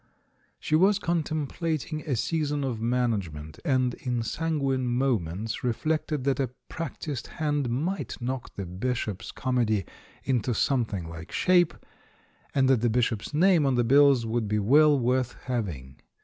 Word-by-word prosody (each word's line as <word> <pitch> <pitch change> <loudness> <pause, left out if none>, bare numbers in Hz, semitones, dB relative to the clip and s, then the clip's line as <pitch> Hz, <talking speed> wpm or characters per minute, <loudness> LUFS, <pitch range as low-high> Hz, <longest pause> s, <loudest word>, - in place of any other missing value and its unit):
She - - -4
was 195 +5 +5
contemplating 155 - -2
a 135 - +1
season 150 +2 -1
of 120 -5 -3
management, 105 -11 -1
and 130 -5 +1
in 120 -2 -2
sanguine 135 0 -1
moments 115 -6 -1
reflected 150 +3 -1
that 135 -1 +1
a 135 -3 0 0.2
prac 165 -3 -5
tised 140 -7 -4
hand 145 -4 0
might 160 +11 -2
knock 125 +1 -4
the 100 - -4
Bishop's 105 +2 -3
comedy 115 -7 0 0.4
into 125 -2 0
something 110 -9 0
like 80 -1 -9
shape, 180 -2 +3 0.8
and 135 -1 +4
that 130 -4 +3
the 120 - +2
Bishop's 115 -2 0
name 170 +1 +4
on 135 -2 +2
the 120 - +3
bills 135 0 +5
would 115 -1 -1
be 105 +1 0
well 145 +8 +5
worth 125 0 +1
having. 85 - -4
125 Hz, 145 wpm, -27 LUFS, 115-145 Hz, 0.8 s, was